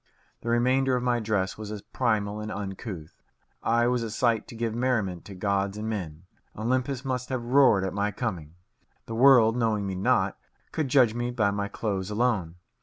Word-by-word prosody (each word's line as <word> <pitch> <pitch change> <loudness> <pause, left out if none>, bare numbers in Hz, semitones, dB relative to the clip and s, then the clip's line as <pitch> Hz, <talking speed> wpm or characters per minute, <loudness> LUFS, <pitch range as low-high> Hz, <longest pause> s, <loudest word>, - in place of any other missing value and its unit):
The 115 - -4
remainder 130 +2 +2
of 125 - -1
my 120 -1 +2
dress 105 -3 -1
was 105 -1 -6
as 105 -2 -6
primal 105 -4 -1
and 105 0 -5
uncouth. 95 -5 -7 0.4
I 115 +1 +2
was 125 0 +1
a 115 - -3
sight 115 0 +1
to - - -10
give 115 -1 -2
merriment 110 -8 -1
to 100 - -9
gods 100 +1 -1
and 105 +1 -4
men. 90 -7 -4 0.3
Olympus 130 +4 -1
must 125 -1 -2
have 130 -3 -2
roared 125 -6 +5
at 95 - -2
my 100 +1 0
coming. 90 -8 -4 0.5
The 115 - -6
world, 120 -2 +6
knowing 110 -4 0
me 95 - -3
not, 95 +1 +1 0.3
could 155 -3 -1
judge 125 -4 +4
me 120 +1 -2
by 110 -5 +1
my 100 0 -2
clothes 100 -2 -3
alone. 105 -7 0
110 Hz, 185 wpm, -27 LUFS, 100-125 Hz, 0.5 s, world